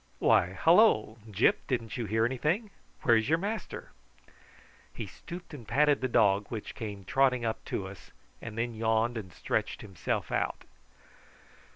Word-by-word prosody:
Why, 90 +8 +3
hallo! 160 - +4
Gyp, 105 +2 +2
didn't 115 -4 -2
you 120 -3 -3
hear 110 +2 +2
anything? 155 - -1 0.3
Where's 115 0 +4
your 160 - +4
master?" 205 +5 -5 1.0
He - - -4
stooped 175 0 -10
and 120 -7 -9
patted 145 -1 +3
the 130 - +1
dog, 105 -4 +3
which 110 -3 -6
came 100 -4 -7
trotting 130 -1 +2
up 110 - -2
to 95 - -3
us, 95 0 -12 0.3
and 115 -2 -7
then 115 +1 -1
yawned 110 +1 +1
and 100 -5 -6
stretched - - -2
himself 95 -5 -3
out. - - -1
115 Hz, 150 wpm, -30 LUFS, 105-135 Hz, 1.0 s, hallo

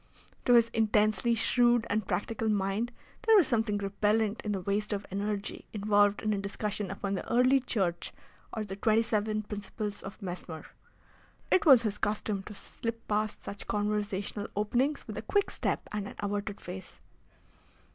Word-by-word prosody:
To 245 - +5
his 230 -1 +6
intensely 220 +1 +2
shrewd 240 +1 +3
and 210 -1 -1
practical 220 +1 -1
mind 205 +3 0 0.3
there 450 0 +5
was 385 -6 +7
something 220 -3 +1
repellent 205 +2 +1
in 210 - -3
the 195 -2 -1
waste 205 +3 -1
of 200 0 -3
energy 200 +1 -3
involved 205 -1 +3
in 215 0 +1
a 200 - -1
discussion 205 0 -3
upon 195 0 -3
the 195 - -4
Early 255 +3 +5
Church 195 -9 -1 0.4
or 220 - -3
the 195 -1 -6
twenty 220 +3 +3
seven 215 -1 0
principles 205 0 -5
of 195 - -9
Mesmer. 175 -4 -6 0.9
It 370 - +4
was 260 -5 +8
his 210 -2 -2
custom 210 -1 -1
to 210 - -8
slip 230 +3 -6
past 210 0 -1
such 200 - -7
conversational 205 -1 -1
openings 245 +8 0
with 215 -1 -5
a - - -4
quick 405 - +1
step - - -2
and 210 -1 -3
an - - -9
averted 205 0 -3
face. 185 +1 -8
210 Hz, 165 wpm, -30 LUFS, 200-225 Hz, 0.9 s, was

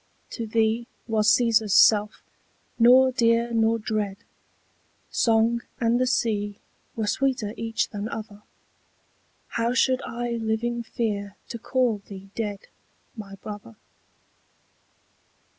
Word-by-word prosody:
To 230 -2 -5
thee 225 +1 +1 0.2
was 215 -2 +2
Cæsar's 220 -2 +3
self 210 0 +4 0.6
nor 255 +3 +7
dear 235 -1 +2
nor 225 0 +3
dread, 210 -3 -2 0.9
Song 230 +1 +2 0.2
and 235 0 +2
the 255 - +2
sea 210 -5 0 0.4
were 220 - -1
sweeter 250 -2 0
each 225 0 -2
than 205 +1 -5
other: 215 -2 -7 1.1
How 235 +2 -1
should 260 0 +2
I 240 +1 -4
living 230 +2 -1
fear 205 -3 -3
to 235 - -6
call 240 -3 0
thee 195 -1 -11
dead 205 -3 -3 0.5
My 200 -3 -9
brother? 195 - -9
225 Hz, 110 wpm, -25 LUFS, 210-235 Hz, 1.1 s, nor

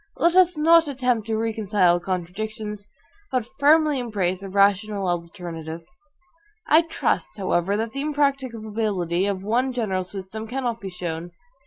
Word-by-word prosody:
Let 340 +1 +3
us 365 -2 +5
not 325 +1 +5
attempt 250 -5 0
to 220 -1 0
reconcile 210 -5 +2
contradictions, 205 +4 -4 0.4
but 255 -3 0
firmly 300 0 +4
embrace 195 -6 -1
a 195 - -7
rational 200 0 +2
alternative. 170 -2 -5 0.8
I 315 +2 +6
trust, 195 - -2
however, 190 0 0
that 225 +1 -2
the 275 - -4
impracticability 225 - -1
of 195 -2 -2
one 245 +5 +1
general 210 -7 -1
system 195 +4 -7
cannot 245 -1 -3
be 195 - -5
shown. 175 -1 -5
210 Hz, 135 wpm, -24 LUFS, 185-255 Hz, 0.8 s, I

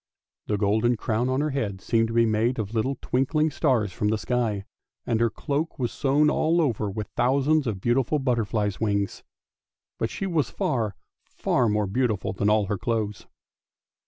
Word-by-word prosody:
The 105 - 0
golden 110 +4 +2
crown 115 +4 0
on 130 +2 +1
her 150 0 0
head 105 -9 -2
seemed 115 +3 +1
to 115 - -5
be 115 0 +5
made 115 +3 +1
of 110 -1 -3
little 130 +4 0
twink 135 +5 0
ling 155 0 +3
stars 125 - +1
from 105 - -1
the 110 +1 +1
sky; 110 -4 -1 0.4
and 115 -2 0
her 115 0 +3
cloak 145 +7 -3
was 120 -3 -1
sewn 145 +2 +2
all 160 +2 +2
over 115 -9 0
with 105 +1 -4
thousands 140 +4 +2
of 105 -4 -2
beautiful 125 +6 +2
butterflies' 110 -6 0
wings. 100 -2 0 0.8
But 115 - 0
she 195 - -4
was 165 -6 0
far, 110 -6 -1 0.3
far 120 -3 +1
more 105 0 +1
beautiful 110 -1 -1
than 100 +2 +1
all 105 -1 +3
her 100 0 -2
clothes. 110 -4 -2
115 Hz, 180 wpm, -25 LUFS, 105-135 Hz, 0.8 s, be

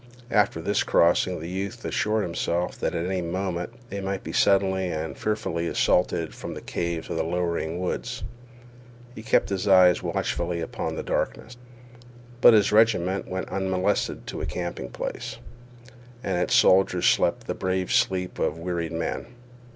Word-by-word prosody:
After 100 -6 +2
this 100 +3 +1
crossing 85 +1 +3
the 80 - -6
youth 95 +2 -5
assured 110 0 0
himself 85 0 -1
that - - -1
at 85 - -1
any 95 0 -1
moment 90 +2 -3 0.2
they 100 - -4
might 95 0 -3
be - - -6
suddenly 95 -1 +3
and 80 -1 -4
fearfully 85 -6 -2
assaulted 85 -1 +1
from - - -7
the - - -7
caves 85 -1 -3
of 85 - -2
the 80 - +1
lowering 85 0 -2
woods. 90 - -3 0.9
He 110 - -9
kept 110 - +2
his 100 0 -2
eyes 90 -2 +6
watchfully 85 -1 -2
upon 80 - -4
the - - -4
darkness. 120 - -2 0.9
But 120 - +9
his 105 -1 +4
regiment 105 -4 +3
went 95 0 -4
unmolested 95 +1 -1
to - - -5
a - - -3
camping 85 -1 -4
place, - - -5 0.9
and 90 -6 0
its - - +2
soldiers 90 -1 +4
slept - - +2
the - - -2
brave 95 0 -2
sleep 90 -1 +1
of 75 - 0
wearied 85 -1 -3
men. 80 +6 -3
90 Hz, 160 wpm, -25 LUFS, 85-95 Hz, 0.9 s, But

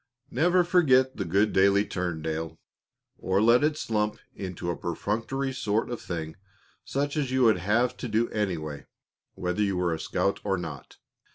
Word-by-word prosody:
"Never 175 +7 +3
forget 130 -7 +3
the 100 - -2 0.2
daily 100 -1 +3
good - - -13
turn, 90 -4 -2
Dale, 80 0 -3 0.6
or 95 +1 +1
let 115 +5 +5
it 150 0 +2
slump 105 -5 -1 0.2
into 90 -3 -4
a - - -3
perfunctory 115 - -2
sort 110 -2 -1
of 120 - -4
thing 80 -3 -5 0.5
such 145 +2 -2
as 145 -4 0
you 130 0 +2
would 110 -4 +5
have 120 +7 +1
to - - -5
do 115 +1 +1
anyway 80 -9 -3 0.5
whether 90 +3 -2
you 100 -3 +1
were 90 -2 +1
a 80 - -4
scout 100 - -1
or 95 -2 0
not. 80 -5 -8
105 Hz, 170 wpm, -27 LUFS, 90-125 Hz, 0.6 s, let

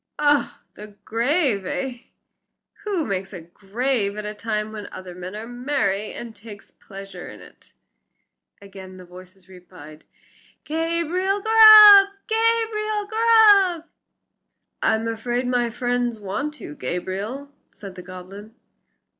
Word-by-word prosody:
"Oh! 290 -1 +1
the 210 0 -13
grave, 240 - 0
eh? 245 +5 -5 0.8
Who 385 -7 -2
makes 190 -1 -5 0.2
graves 210 0 -2
at 210 0 -6
a 210 - -5
time 215 0 -4
when 210 -2 -8
other 185 -1 -10
men 180 +2 -9
are 215 +1 -7
merry, 240 -5 -2
and 235 -2 -9
takes 205 -1 -13
a - - -37
pleasure 195 -1 -11
in - - -12
it?" - - -18 0.9
Again 190 -1 -12
the 185 - -13
voices 185 +1 -16
replied, 165 -5 -15 0.6
"Gabriel 335 +5 -2
Grubb! 430 -2 +9 0.2
Gabriel 445 -2 -1
Grubb!" 415 -5 +4 1.0
"I'm 220 +1 0
afraid 240 +2 -3
my 245 -1 0
friends 245 -1 -2
want 280 +10 -5
you, 145 - -9
Gabriel," 195 - -6 0.2
said 195 -2 -12
the 185 - -10
goblin. 185 +4 -12
230 Hz, 120 wpm, -22 LUFS, 195-325 Hz, 1.0 s, Grubb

